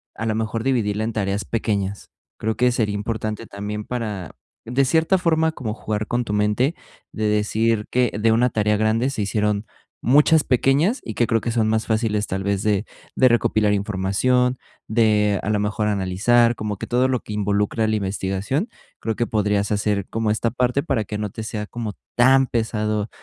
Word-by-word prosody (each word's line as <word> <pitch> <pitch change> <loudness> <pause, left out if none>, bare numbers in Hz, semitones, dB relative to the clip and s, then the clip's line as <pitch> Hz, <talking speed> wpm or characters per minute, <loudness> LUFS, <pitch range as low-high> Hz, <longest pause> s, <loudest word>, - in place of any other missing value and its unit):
a 110 - -4
lo 110 -1 0
mejor 110 0 -2
dividirla 110 -5 0
en 115 - -1
tareas 100 -2 -1
pequeñas. 100 -2 -2 0.3
Creo 110 0 -1
que 125 0 +3
sería 110 -4 0
importante 110 +1 -3
también, 105 +1 -5
para 105 - -5 0.3
de 125 +4 +1
cierta 160 +7 +3
forma, 160 -2 +2
como 120 -8 -4
jugar 105 -2 -3
con 120 0 0
tu 110 - -5
mente, 105 +9 +1 0.4
de 110 - -3
decir 105 +1 +1
que 125 -2 +2
de 110 +2 +3
una 120 +3 +3
tarea 105 -2 +1
grande 110 +4 +1
se 135 -5 -3
hicieron 105 +1 0 0.4
muchas 150 +4 +5
pequeñas 140 - +2
y 110 - -5
que 120 +2 +1
creo 115 -1 +1
que 120 - -2
son 115 -2 +1
más 110 +1 +1
fáciles, 110 -2 0
tal 95 -1 -3
vez, 100 0 -1
de 105 -1 +1 0.3
de 130 - +5
recopilar 110 -3 +2
información 105 +6 +1 0.3
de 105 -3 +2
a - - -2
lo 105 -1 +1
mejor 105 +1 -1
analizar 105 +5 +2
como 105 -2 -4
que - - -6
todo 125 +2 +2
lo 130 -1 +1
que 105 - -8
involucra 105 +2 0
la 110 - +1
investigación, 100 - -2 0.3
creo 110 -1 -2
que 120 - -1
podrías 105 -1 0
hacer 100 -1 0
como 110 -1 -1
esta 110 +2 0
parte 125 +2 +1
para 135 -9 0
que 105 +1 -5
no 105 0 -3
te 110 +3 -7
sea 105 -1 -4
como 115 -4 -5 0.2
tan 130 +2 +5
pesado 110 -2 -1
110 Hz, 190 wpm, -22 LUFS, 105-120 Hz, 0.4 s, muchas